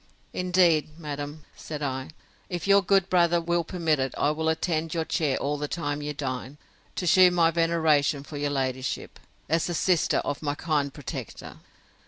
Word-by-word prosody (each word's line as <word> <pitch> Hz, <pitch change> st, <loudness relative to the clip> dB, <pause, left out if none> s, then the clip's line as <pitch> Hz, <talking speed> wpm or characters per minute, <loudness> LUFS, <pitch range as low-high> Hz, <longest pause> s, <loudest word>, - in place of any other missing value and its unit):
—Indeed, 175 Hz, -4 st, +2 dB
madam, 145 Hz, -1 st, -6 dB
said 150 Hz, -1 st, -6 dB
I, 130 Hz, 0 st, -3 dB, 0.4 s
if 175 Hz, -3 st, -4 dB
your 200 Hz, 0 st, +6 dB
good 195 Hz, -1 st, +3 dB
brother 175 Hz, -2 st, +3 dB
will 170 Hz, 0 st, 0 dB
permit 165 Hz, -4 st, 0 dB
it, 130 Hz, 0 st, -2 dB
I 145 Hz, -, +2 dB
will 160 Hz, +1 st, -1 dB
attend 160 Hz, 0 st, -1 dB
your 165 Hz, -1 st, 0 dB
chair 150 Hz, -5 st, 0 dB
all 145 Hz, +1 st, -2 dB
the 150 Hz, -, -2 dB
time 145 Hz, -2 st, -3 dB
you 150 Hz, 0 st, -3 dB
dine, 135 Hz, -1 st, -5 dB, 0.4 s
to 180 Hz, -, -3 dB
shew 185 Hz, +1 st, +7 dB
my 170 Hz, -2 st, +3 dB
veneration 160 Hz, -4 st, +2 dB
for 145 Hz, +1 st, -8 dB
your 145 Hz, 0 st, -1 dB
ladyship, 130 Hz, -2 st, -3 dB, 0.3 s
as 165 Hz, +2 st, +1 dB
the 175 Hz, -, -2 dB
sister 170 Hz, -1 st, +2 dB
of 145 Hz, -, -3 dB
my 145 Hz, -2 st, -1 dB
kind 145 Hz, -3 st, 0 dB
protector. 145 Hz, -1 st, -8 dB
155 Hz, 175 wpm, -26 LUFS, 145-170 Hz, 0.4 s, shew